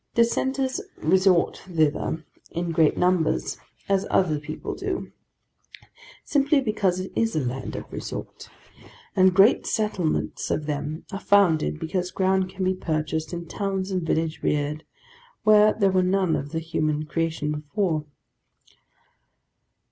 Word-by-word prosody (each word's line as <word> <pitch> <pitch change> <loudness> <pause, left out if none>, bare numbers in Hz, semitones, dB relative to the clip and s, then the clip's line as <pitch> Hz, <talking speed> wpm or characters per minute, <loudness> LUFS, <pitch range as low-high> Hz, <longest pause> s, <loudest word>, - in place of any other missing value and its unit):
Dissenters 260 +3 +1 0.2
resort 185 -2 +3
thither 160 -1 0 0.2
in 170 0 -3
great 160 -2 +3
numbers, 165 - +1 0.3
as 195 -1 +1
other 155 -5 +2
people 150 +1 -6
do, - - -4 1.1
simply 285 0 +3
because 210 -7 0
it 185 - -5
is 225 0 +1
a - - +2
land 130 +2 -4
of - - -5
resort; - - -7 0.7
and 185 -1 +5
great 200 +5 +5
settlements 205 -7 -1
of 150 - -1
them 150 +1 -4
are 195 - -4
founded, 165 - +3
because 180 +2 -2
ground 190 0 +1
can 190 0 -5
be 185 - +2
purchased, 155 -3 -2
and 170 -1 -5
towns 195 +1 -2
and 185 -1 0
villages 160 -1 -1
reared, 150 +1 -1 0.6
where 215 0 +6
there 200 -3 +2
were 185 0 +3
none 185 -2 +2
of 145 - -4
the 165 - -3
human 155 -2 -1
creation 160 -1 -1
before. 155 +1 -1
180 Hz, 135 wpm, -25 LUFS, 155-195 Hz, 1.1 s, where